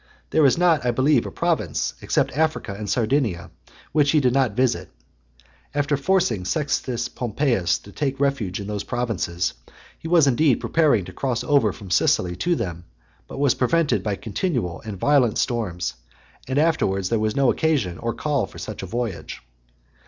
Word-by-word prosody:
There 155 -3 +5
is 130 - +2
not, 170 -5 +3
I 125 - +1
believe, 130 +2 +2
a - - -7
province, - - -1
except - - 0
Africa 155 -9 0
and 105 +1 -6
Sardinia, 115 -7 0 0.4
which 150 -2 +3
he 155 - +5
did 125 -3 +2
not 130 -6 +1
visit. 125 -1 0 0.9
After 145 0 +1
forcing 155 - +1
Sextus 125 - -1
Pompeius 120 - 0
to 100 - -14
take 135 +3 -2
refuge 135 -10 0
in 100 - -5
those 105 0 -3
provinces, 110 - -2 0.5
he - - -7
was 165 -3 +5
indeed 135 0 +3
preparing 145 - +2
to - - -10
cross 125 -3 -2
over 140 -8 +3
from 95 0 -11
Sicily 90 0 +2
to 175 - +1
them, 85 - -4 0.4
but - - -9
was 140 -2 +3
prevented 160 +4 +1
by 105 -2 -2
continual 110 - -3
and 105 -3 -6
violent 130 -1 +3
storms, 90 - -1 0.5
and 130 +1 -2
afterwards 100 - +1
there 115 - +1
was 110 0 -1
no 135 -2 +4
occasion 135 - 0
or 115 -1 -3
call 145 +1 0
for - - -14
such - - -6
a - - -6
voyage. 115 -6 -4
125 Hz, 170 wpm, -23 LUFS, 105-145 Hz, 0.9 s, There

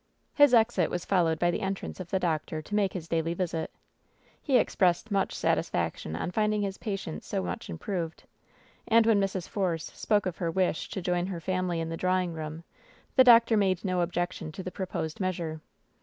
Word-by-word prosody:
His 290 -2 +6
exit 220 -7 +3
was 175 - -3
followed 170 -4 +2
by 175 +2 +2
the 175 - -3
entrance 195 -1 -4
of 180 -2 -7
the 190 - +1
doctor 160 -3 -1
to 155 +7 -10
make 205 -2 +2
his 170 -3 -5
daily 165 0 0
visit. 170 -3 -2 0.7
He 270 -4 +3
expressed 190 -1 +1
much 195 -1 +1
satisfaction 80 - -1
on 90 - -3
finding 210 +1 +1
his 195 -1 -4
patient 195 -7 -4
so 95 - -2
much 90 0 -5
improved. 165 - -4 0.6
And 230 0 +5
when 220 -3 +4
Mrs. 190 -2 -2
Force 175 -6 -2
spoke 210 -2 +1
of 180 -3 -3
her 170 - -1
wish 180 -1 0
to 190 - -5
join 180 0 0
her 185 -3 -4
family 185 0 -1
in 165 0 -3
the 165 - -4
draw 185 +1 +2
ing 180 -2 -2
room, 160 +1 -6 0.5
the 260 - +8
doctor 230 -2 +7
made 190 -3 +1
no 185 -2 +1
objection 175 -2 -2
to 190 - -6
the 185 - -5
proposed 175 -5 -4
measure. 170 -4 -2
180 Hz, 195 wpm, -28 LUFS, 165-195 Hz, 0.7 s, the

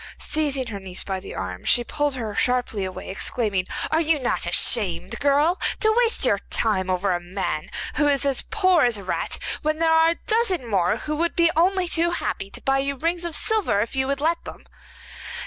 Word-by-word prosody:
Seizing 285 -4 -1
her 215 -4 -6
niece 190 -1 -5
by 190 -1 -3
the - - -9
arm, 90 -1 -5
she 240 - +2
pulled 290 +2 -1
her 225 -4 -4
sharply 230 -2 0
away, 185 0 -7
exclaiming: 195 -2 -2 0.2
'Are 320 +1 +3
you 320 -1 +2
not 255 -4 -1
ashamed, 185 -6 +2
girl, 290 +5 +2 0.2
to 435 0 +3
waste 475 -1 +2
your - - +2
time 190 -4 0
over 185 +2 0
a 175 - -1
man 175 -3 -4 0.3
who 295 - +3
is 280 -1 +1
as 275 -2 +1
poor 370 -6 +3
as 240 -3 +3
a 200 - -9
rat, 185 - -2 0.2
when 310 +1 0
there 325 0 +2
are 320 0 +5
a 335 - 0
dozen 430 - +1
more 195 -1 +1
who 300 +6 -4
would 340 +2 0
be 335 -1 +4
only 365 +2 +2
too 340 0 +1
happy 195 - -3
to - - -6
buy 270 0 +2
you 275 +1 -1
rings 335 +5 -2
of 335 -2 -2
silver, 430 - +2
if 225 +5 -2
you 265 0 0
would 280 0 -2
let 330 +2 0
them? - - -10
275 Hz, 210 wpm, -23 LUFS, 200-330 Hz, 0.3 s, are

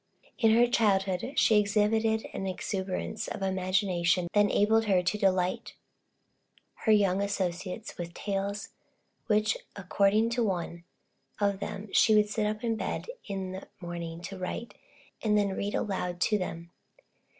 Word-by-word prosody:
In 225 -3 +5
her 240 +1 +6
childhood, 200 -1 +1
she 215 -2 +5
exhibited 220 +2 +2
an 195 - -3
exuberance 190 0 -3
of 195 - -5
imagination 185 -2 +1
that 205 - +4
enabled 215 +2 +3
her 190 -4 +3
to 180 - 0
delight 185 -2 0 1.0
her 220 - 0
young 200 -2 +4
associates 190 0 -3
with 170 0 -6
tales, 200 0 -3 0.6
which, 215 -1 +2 0.2
according 200 +3 +2
to 240 0 +1
one 170 -4 -3 0.5
of 200 -2 +1
them, 205 +1 -5
she 220 - +5
would 210 0 +4
sit 210 0 0
up 215 +1 -3
in 225 -1 0
bed - - -4 0.2
in 190 -2 -4
the 190 +1 -8
morning 170 -1 -6
to 190 +1 -7
write, 205 +4 -5 0.5
and 210 -1 +2
then 205 -1 +2
read 205 +1 -2
aloud 180 -3 -2
to 210 -2 +2
them. 170 -2 -5
200 Hz, 145 wpm, -29 LUFS, 185-215 Hz, 1.0 s, her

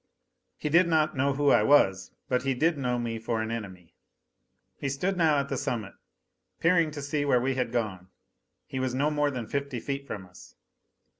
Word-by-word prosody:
He - - -3
did 170 +4 +5
not 155 -2 +2
know 140 +1 +1
who 145 0 +3
I - - +5
was, 95 -10 +4 0.2
but 125 -1 +1
he 135 0 0
did 160 +6 +2
know 125 -3 -1
me 115 -1 -3
for 115 0 -2
an 110 0 -2
enemy. 95 -7 -7 0.9
He 140 - -2
stood 180 +9 -1
now 160 -4 +3
at 140 0 0
the 135 - -3
summit, 115 -5 -3 0.7
peering 165 -1 +3
to 145 -2 -7
see 145 +1 -1
where 140 -3 +3
we 130 +2 0
had 125 -3 -2
gone. 105 -7 -2 0.6
He 130 - -5
was 130 -1 -1
no 145 +3 +1
more 150 -1 +1
than 125 -4 -4
fifty 140 +1 -3
feet 140 +2 -4
from 95 -3 -6
us. 90 0 -16
135 Hz, 200 wpm, -28 LUFS, 115-145 Hz, 0.9 s, did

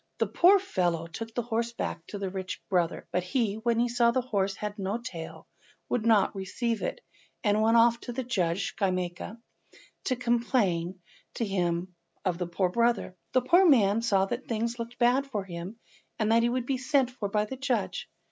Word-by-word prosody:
The - - +2
poor 375 +4 +6
fellow 175 - -1
took 225 +7 -7
the 245 - 0
horse 235 0 -1
back 165 -7 -4
to 205 - -6
his 195 -2 -4
rich 190 -1 -4
brother, 175 -2 0
but 180 +1 +1
he, 215 +2 0
when 230 +1 +1
he 240 - +3
saw 240 0 +3
that 255 - +2
the - - -15
horse 195 -4 0
had 210 0 -5
no 195 +3 -1
tail, 180 -10 -8 0.4
would 230 -2 0
not 215 -4 +4
receive 215 +4 -2
it, - - -3 0.4
and 210 -1 +3
went 225 +1 +4
off 235 0 +5
to 245 - -7
the 260 +2 -3
judge 190 -6 -1
Schemyaka 185 +1 -2 0.7
to 255 - +1
complain 230 -8 0 0.4
to 230 - -1
him 180 -2 -1 0.3
of 180 -2 0
the 180 - -2
poor 180 +2 0
brother. 235 -2 +1 0.2
The 255 - +4
poor 350 +9 +5
man 225 - +5
saw 200 -4 +3
that 240 +6 -5
things 230 +1 -2
looked 235 +1 -6
bad 255 +3 +3
for 210 -7 -3
him, 180 +3 -7 0.4
and 220 -1 +1
that 230 +1 +5
he 235 - +2
would 250 0 -1
be 265 0 -1
sent 260 -1 +2
for 215 -5 -4
by 210 +1 +1
the 240 - -6
judge. 265 -2 -2
225 Hz, 200 wpm, -28 LUFS, 190-240 Hz, 0.7 s, poor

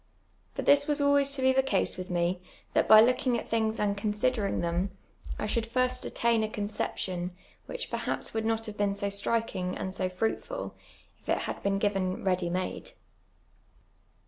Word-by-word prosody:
But - - -3
this 285 +1 +5
was 295 0 +1
always 285 -1 +4
to 270 -2 -2
be 260 0 +5
the 265 - +4
case 235 -8 0
with 185 0 -6
me, 175 +1 0 0.3
that - - +3
by 215 0 +10
lookinj; 250 0 +2
at - - -7
thin;::s 220 -1 0
and 205 -1 +1
consi(lerin«>: 210 +1 0
them, 175 +3 0 0.5
I - - -2
sliould 225 +2 -1
Hrst 255 +1 +1
attain 230 -1 +1
a 215 - -1
coneei)tion, 205 -4 -3 0.4
wliich - - -3
j)erhaj)s - - -3
would 225 0 -1
not 225 0 0
have 215 -2 -7
been 200 -1 +1
so 200 0 -2
strikinL; 200 -2 -1
and 190 - -3
so 185 -1 -1
fruitful, 225 - -3 0.5
if - - -15
it - - +3
had - - -4
been 200 0 +1
given 195 -2 0
ready 180 -2 +1
made. 185 - -3
210 Hz, 175 wpm, -29 LUFS, 190-240 Hz, 0.5 s, by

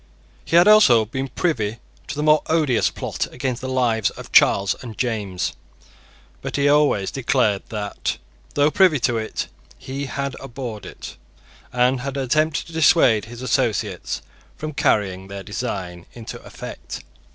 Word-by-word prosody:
He - - -1
had 175 +3 +7
also 150 - +7
been 130 +5 -4
privy 120 -7 -1 0.3
to - - -5
the 150 - -2
more 155 0 +5
odious 155 -7 +2
plot - - -3
against 125 -1 -3
the 130 - -4
lives 120 -5 +1
of - - -11
Charles 100 0 +5
and 115 -4 -9
James. 105 -7 -2 0.9
But - - -5
he 145 0 +2
always 145 -9 +3
declared 120 -6 +1
that, 105 -2 -3 0.4
though 145 +1 +4
privy 180 -6 +4
to 115 -1 +1
it, 110 - -3 0.3
he 135 - -5
had 140 0 -3
abhorred 120 -4 -7
it, - - -9 0.5
and 125 +1 +2
had 140 +1 -4
attempted 150 +4 +1
to 165 - -13
dissuade 145 - +4
his 120 +2 -9
associates 130 - -1 0.3
from 155 0 -5
carrying 95 -7 +1
their 100 0 -7
design 95 -5 -5
into 115 -2 -8
effect. - - -8
125 Hz, 150 wpm, -22 LUFS, 110-145 Hz, 0.9 s, had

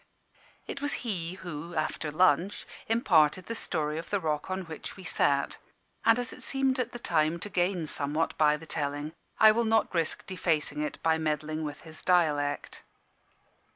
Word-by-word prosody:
It 280 - -6
was 290 0 0
he 180 -5 -2
who, 170 -2 -7
after 155 0 -1
lunch, 180 +4 +2 0.2
imparted 185 -7 +3
the 230 - -4
story 155 -8 -2
of 165 - -8
the 200 - +1
rock 155 -1 -2
on 190 0 -2
which 160 +2 -8
we 190 - -10
sat; 140 -4 +1 0.4
and 225 +1 +5
as 245 0 -3
it - - -12
seemed 270 -1 +1
at 250 -1 -1
the - - -6
time 160 -7 +1
to 205 - -4
gain 175 -2 0
somewhat 150 +2 -1
by 150 -1 +4
the 160 - -11
telling, 145 0 -3 0.3
I 220 0 +9
will 235 +2 +1
not 225 -1 +2
risk 165 -2 -1
defacing 160 -5 0
it 150 - -3
by 160 0 +3
meddling 155 0 -1
with 150 -1 -5
his 160 -1 -9
dialect. 150 -5 +1
165 Hz, 175 wpm, -29 LUFS, 150-190 Hz, 0.4 s, I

